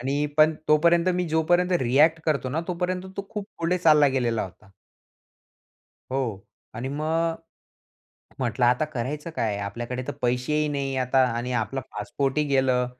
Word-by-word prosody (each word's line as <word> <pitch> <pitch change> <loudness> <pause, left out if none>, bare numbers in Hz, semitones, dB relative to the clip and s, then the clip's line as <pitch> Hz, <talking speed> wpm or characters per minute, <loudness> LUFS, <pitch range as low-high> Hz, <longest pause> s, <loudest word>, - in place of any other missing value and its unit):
आणि 140 +4 0
पण 155 +1 +5
तोपर्यंत 170 +3 +4
मी 180 -1 -1
जोपर्यंत 175 +3 +2
रिएक्ट 150 +6 +4
करतो 140 -5 0
ना, 155 +5 -1
तोपर्यंत 180 +1 -2
तो 200 - -5
खूप 210 -2 -5
पुढे 170 +2 0
चालला 150 -4 +5
गेलेला 115 -3 0
होता. 95 +3 -11 1.4
हो. 120 -7 -3 0.3
आणि 120 +4 -4
मग 160 +3 0 1.0
म्हटलं 120 -1 0
आता 125 +5 +3
करायचं 150 +3 -4
काय? 105 -3 0
आपल्याकडे 120 +5 -4
तर - - -3
पैसेही 125 +5 +1
नाही 140 -2 -2
आता 130 +1 +1 0.2
आणि 125 +2 -3
आपला 120 +3 -1
पासपोर्ट 140 +1 -2
ही 150 - +2
गेलं. 130 -2 +2
140 Hz, 150 wpm, -25 LUFS, 125-160 Hz, 1.4 s, पण